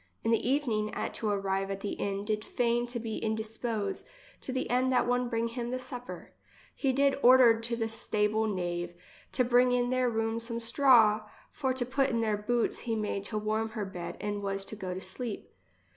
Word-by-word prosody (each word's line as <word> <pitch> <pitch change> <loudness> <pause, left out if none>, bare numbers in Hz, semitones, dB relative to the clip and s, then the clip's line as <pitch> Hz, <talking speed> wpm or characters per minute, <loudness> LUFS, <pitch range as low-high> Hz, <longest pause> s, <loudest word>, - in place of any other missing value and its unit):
In 225 - +1
the 230 +1 +2
even 280 -2 +1
ing 215 0 -1
at - - -3
to 220 - -1
arrive 195 -1 0
at 195 0 -4
the 205 - -3
inn 200 0 -3
did 215 0 -1
feign 240 +1 0
to 240 0 -3
be 225 -1 -4
in 220 0 -1
dispose, 220 0 -3 0.4
to - - -5
the 260 0 -1
end 255 +1 +2
that 250 - +3
one 245 0 +1
bring 230 -1 0
him 240 0 -4
the 255 - -1
sup 250 -1 -7
per. - - -9 0.4
He 270 - 0
did 275 +1 +2
ordered 245 -3 +7
to 235 +1 -2
the 225 -1 -1
stable 220 -1 0
knave 175 -3 -3 0.4
to 255 - +3
bring 245 +1 +4
in 245 0 +1
their 255 -1 +2
room 225 0 -1
some 230 0 -3
straw, 230 -3 +4 0.2
for 265 -2 -1
to 255 -2 -1
put 270 +2 +1
in 230 -2 0
their 215 -2 +1
boots 230 +3 0
he 230 -2 -2
made 210 -2 -2
to 215 - -3
warm 215 +1 -1
her 215 -2 -4
bed 180 -3 -6
and 205 0 -3
was 195 -1 -2
go 205 -3 -6
lo 180 - -4
sleep. 205 +4 -5
225 Hz, 215 wpm, -30 LUFS, 210-245 Hz, 0.4 s, ordered